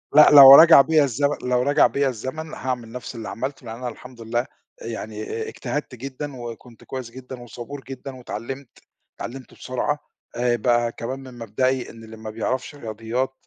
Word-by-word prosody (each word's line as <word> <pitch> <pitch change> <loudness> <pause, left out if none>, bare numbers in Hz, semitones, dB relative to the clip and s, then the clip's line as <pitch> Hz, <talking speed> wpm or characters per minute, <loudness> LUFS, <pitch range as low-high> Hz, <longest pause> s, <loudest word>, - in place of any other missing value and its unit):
لأ، 150 - +9
لَو 140 -1 +12
رَجَع 160 -3 +9
بيّا 155 0 +3
الزمن 140 +3 0
لَو 125 0 +1
رجع 145 +3 +4
بيّا 140 -1 0
الزمن، 140 +7 -6
هاعمَل 125 -3 -4
نَفْس 125 0 -7
اللي 115 -2 -6
عَمَلتُه، 130 +1 -5
لأن 110 0 -6
أنا 125 +1 -6
الحمد 125 0 -12
لله 120 +2 -1 0.4
يعني 110 -2 -6
أ 110 0 -4
أ - - -9
اجتَهَدت 130 +1 -5
جدًا، 135 +3 -7
وكُنت 120 0 -10
كويس 130 -3 -6
جدًا، 130 0 -10
وصبور 120 +4 -9
جدًا، 135 0 -7
واتعَلَّمت 125 +2 -7 0.5
اتعَلَّمت 130 +2 -8
بسرعة 130 +4 -2 0.4
آآ 120 0 +1
بقى 120 0 +1
كمان 130 +4 -6
من 130 -2 -12
مبدئي 125 +3 -1
إن 115 0 -12
اللي 110 0 -11
ما 110 0 -8
بَيعرَفش 125 +6 -3
رياضيات، 115 +2 -3
125 Hz, 180 wpm, -23 LUFS, 115-135 Hz, 0.5 s, لَو